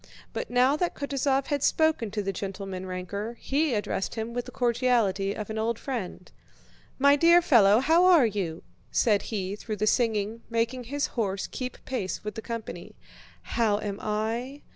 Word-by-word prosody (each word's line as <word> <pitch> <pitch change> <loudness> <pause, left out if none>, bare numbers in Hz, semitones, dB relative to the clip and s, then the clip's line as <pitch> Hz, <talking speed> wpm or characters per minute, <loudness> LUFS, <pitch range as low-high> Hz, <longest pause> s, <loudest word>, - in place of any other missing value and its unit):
But - - -4
now 250 +3 +4
that 350 +2 -1
Kutúzov 275 -1 0
had 285 -1 -1
spoken 315 -7 +2
to 210 0 -3
the 195 0 -2
gentleman 195 -1 -5
ranker, 200 +5 -5
he 285 -2 0
addressed 205 -2 -2
him 225 +1 -4
with 245 0 -3
the 250 - -9
cordiality 235 -6 +1
of 215 -1 -5
an 220 - -3
old 225 +1 0
friend. 220 -9 -5 0.7
"My 280 +1 +5
dear 335 +4 +6
fellow, 225 - +5
how 325 +6 +4
are 345 -8 +7
you?" 190 -7 -3 0.3
said 210 -4 +3
he 200 -3 -3
through 215 +1 -5
the 210 +1 -1
singing, 220 -1 +1
making 235 +2 -1
his 285 +4 -1
horse 200 -5 -2
keep 255 -1 -6
pace 200 -10 -3
with 210 0 -4
the 225 - -6
company. 230 -1 -7 0.5
"How 220 -3 +1
am 205 -1 -4
I?" 230 +6 -3
230 Hz, 170 wpm, -27 LUFS, 205-260 Hz, 0.7 s, are